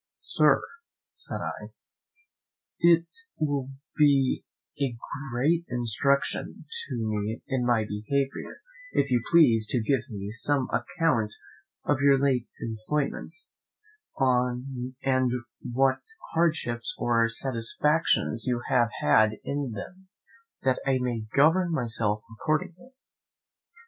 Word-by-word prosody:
"Sir," - - +3 0.5
said - - -5
I, - - -6 1.1
"it 170 -1 +5 0.3
will 140 -3 -1 0.3
be 140 -3 +3 0.4
a 130 -4 0 0.3
great 155 +8 +2
instruction 125 +3 0 0.2
to 130 - -4
me 110 -1 -2
in 130 -2 0
my 115 -3 +3
behaviour 135 - -3 0.3
if 140 -1 +1
you 120 -1 +3
please 120 -11 +5
to 125 - +1
give 120 +2 0
me 100 -2 -5
some 130 +3 +1
account 120 -11 0 0.5
of 145 -2 +1
your 140 -1 +6
late 130 -4 +1
employments, 140 - -3 0.7
and 125 0 0 0.7
what 130 +2 +1 0.3
hardships 155 -8 0
or 115 -1 +2
satisfactions 120 - +1
you 120 -1 0
have 120 -3 +3
had 110 +9 +4
in 140 -4 -3
them, 185 - -9 0.6
that 130 -1 +1
I 135 -1 +2
may 120 -3 -2
govern 165 +5 +4
myself 115 -7 0 0.2
accordingly." 175 +11 -2
130 Hz, 105 wpm, -27 LUFS, 115-145 Hz, 1.1 s, your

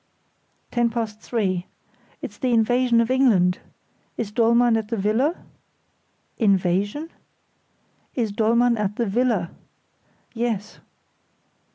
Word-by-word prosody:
"Ten 240 -1 +2
past 225 -2 -4
three. 190 -7 -2 0.6
It's - - -7
the 255 -2 0
invasion 235 +1 +3
of 230 +2 -1
England! 205 -9 +3 0.6
Is 215 -3 -3
Dollmann 235 +1 +3
at 220 -2 -1
the 230 +1 -3
villa?" 225 - +1 1.0
"Invasion?" 200 - +1 1.0
"Is 230 -5 -1
Dollmann 230 +3 +2
at 210 -1 -2
the 235 - 0
villa?" 215 -4 0 0.8
"Yes." 225 -3 -3
225 Hz, 100 wpm, -23 LUFS, 205-240 Hz, 1.0 s, invasion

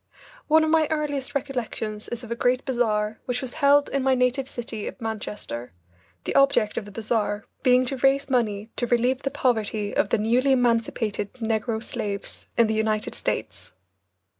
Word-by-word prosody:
One 315 +1 +5
of 315 - +1
my 320 -2 +4
earliest 295 -4 -2
recollections 230 -6 -3
is 240 +1 -5
of 235 - -9
a - - 0
great 250 +2 +1
bazaar 220 -4 0
which 250 -1 -1
was 255 -2 -6
held 285 0 +5
in 275 - 0
my 265 0 +3
native 255 +1 +1
city 230 -4 -5
of - - -7
Manchester, 210 - -5 0.5
the - - -3
object 275 -6 +3
of 210 - -3
the 205 - -10
bazaar 210 -1 -1 0.2
being 255 0 +4
to 270 +2 -2
raise 270 +2 +3
money 225 -4 0
to 245 - 0
relieve 245 +2 +2
the 275 - -1
poverty 220 -6 0
of - - +2
the - - +3
newly 245 +6 +3
emancipated 230 -4 0
negro 225 -1 -2
slaves 210 -5 -4
in 235 - +6
the 220 - 0
United 215 -1 0
States. - - -4
240 Hz, 175 wpm, -25 LUFS, 215-265 Hz, 0.5 s, in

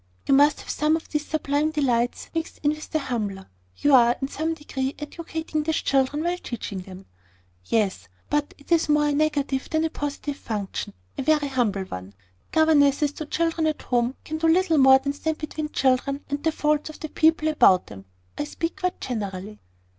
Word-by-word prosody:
"You - - +4
must 285 +1 +5
have - - -13
some 305 +1 +2
of 325 - -6
these 300 -1 -2
sublime 300 0 0
delights 250 -6 0
mixed 325 0 -4
in 295 - +4
with 305 0 -7
the 315 - 0
humbler. 210 -9 -3 0.3
You 290 - +2
are, 240 -2 +6
in 270 - -3
some 320 +3 -2
degree, 270 -3 -4
educating 320 +1 -4
these 315 +1 -1
children 275 +3 +1
while 350 +1 -1
teaching 215 - -5
them." 185 +1 -11 0.6
"Yes: 195 - 0 0.2
but 295 0 -1
it 285 - -20
is 330 -2 +3
more 295 0 +3
a - - +1
negative 285 -3 0
than 315 0 +1
a 320 - -2
positive 290 0 -4
function, 205 -7 -4 0.3
a - - +1
very 300 0 +2
humble 225 -7 0
one. 95 - -8 0.4
Governesses 295 -2 +4
to 305 +1 -7
children 330 0 0
at 310 - -2
home 245 +1 0
can 315 0 -4
do 325 - +2
little 330 -1 +3
more 265 0 +8
than 280 +1 -3
stand 315 +2 -2
between 310 0 -4
children 275 +1 +1
and 285 0 -2
the 320 - +2
faults 300 0 0
of 310 - -10
the 310 - -4
people 315 0 +3
about 190 -12 +5
them. 95 -2 -11 0.3
I - - 0
speak 330 +3 -4
quite 365 0 -1
generally." 205 -3 -5
290 Hz, 190 wpm, -24 LUFS, 250-310 Hz, 0.6 s, more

